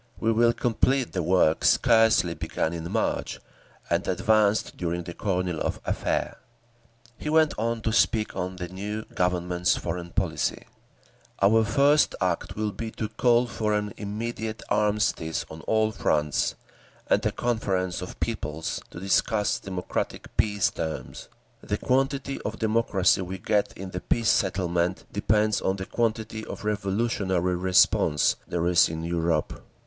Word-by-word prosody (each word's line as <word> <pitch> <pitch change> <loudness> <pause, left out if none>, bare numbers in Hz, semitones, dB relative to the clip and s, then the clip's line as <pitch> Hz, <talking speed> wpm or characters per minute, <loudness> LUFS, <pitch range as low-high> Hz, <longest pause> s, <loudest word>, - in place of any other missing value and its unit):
We 115 - +2
will 115 +1 +4
complete 125 +2 +1
the 90 - 0
work 85 -2 +2
scarcely 110 -6 +4
begun 80 -1 -2
in 85 0 -5
March, - - -1 0.5
and - - 0
advanced 105 +3 +2
during 85 0 -2
the 85 - -7
Kornilov 90 -4 -1
affair…." - - -1 0.8
He 150 - -4
went 155 -1 +4
on 115 +1 -1
to 110 0 -1
speak 110 -1 +2
of 95 0 -3
the 90 -1 -4
new 105 +4 -5
Government's 90 0 +1
foreign 85 0 -4
policy: 85 -4 -1 0.7
"Our 110 +3 +5
first 145 +6 +3
act 90 -3 -1
will 105 0 -1
be 115 +2 -5
to 110 - -4
call 120 0 +3
for 105 -3 -1
an 105 -1 -2
immediate 110 +1 -4
armistice 105 -6 0
on 80 +1 -9
all 110 0 +2
fronts, 75 -8 0 0.5
and - - +2
a - - +1
conference 95 -7 -1
of 90 - -8
peoples 80 -8 -3
to - - -9
discuss 105 +3 +1
democratic 95 -2 -4
peace 105 -2 +2
terms. 80 -1 -5 0.3
The - - -2
quantity 135 +1 0
of 110 +1 -4
democracy 105 -4 +2
we 95 +1 -5
get 105 +2 0
in 95 0 -8
the 90 - -5
peace 115 -2 +1
settlement 90 -2 0
depends 105 +1 +1
on 95 - 0
the 95 -1 -5
quantity 110 -1 -2
of - - -8
revolutionary 100 -3 0
response 90 -4 +3
there 85 -1 -1
is 85 -1 +5
in 80 0 -5
Europe. 85 -2 -1
100 Hz, 145 wpm, -26 LUFS, 90-110 Hz, 0.8 s, Our